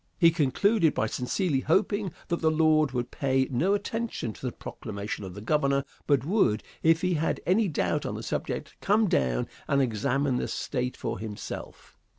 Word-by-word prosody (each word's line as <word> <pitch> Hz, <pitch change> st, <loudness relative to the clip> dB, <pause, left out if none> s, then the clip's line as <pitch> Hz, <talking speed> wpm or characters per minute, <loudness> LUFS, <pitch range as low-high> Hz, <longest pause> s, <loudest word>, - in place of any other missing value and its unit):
He 165 Hz, -3 st, +6 dB
concluded 165 Hz, -, +2 dB
by -, -, +1 dB
sincerely 135 Hz, -, 0 dB
hoping 195 Hz, -, +1 dB, 0.2 s
that 170 Hz, -, +1 dB
the 160 Hz, -, +4 dB
Lord 155 Hz, -1 st, +4 dB
would 120 Hz, -1 st, -3 dB
pay 135 Hz, -1 st, +1 dB
no 175 Hz, +11 st, +2 dB
attention 205 Hz, -, -3 dB
to -, -, -15 dB
the 125 Hz, -, -1 dB
proclamation 105 Hz, -2 st, -6 dB
of 95 Hz, -2 st, -7 dB
the 100 Hz, -, -7 dB
Governor, 140 Hz, +2 st, +2 dB, 0.2 s
but 140 Hz, -2 st, +3 dB
would, 155 Hz, -, +2 dB, 0.2 s
if 165 Hz, +1 st, +3 dB
he 180 Hz, 0 st, +2 dB
had 160 Hz, 0 st, 0 dB
any 200 Hz, +4 st, +3 dB
doubt 155 Hz, -, 0 dB
on -, -, -3 dB
the -, -, -6 dB
subject, -, -, -3 dB
come 210 Hz, +2 st, +3 dB
down 65 Hz, -, +1 dB, 0.2 s
and 140 Hz, -, +2 dB
examine 130 Hz, +2 st, +1 dB
the -, -, -1 dB
State 125 Hz, 0 st, -3 dB
for -, -, -3 dB
himself. 105 Hz, -2 st, -8 dB
145 Hz, 175 wpm, -28 LUFS, 125-175 Hz, 0.2 s, He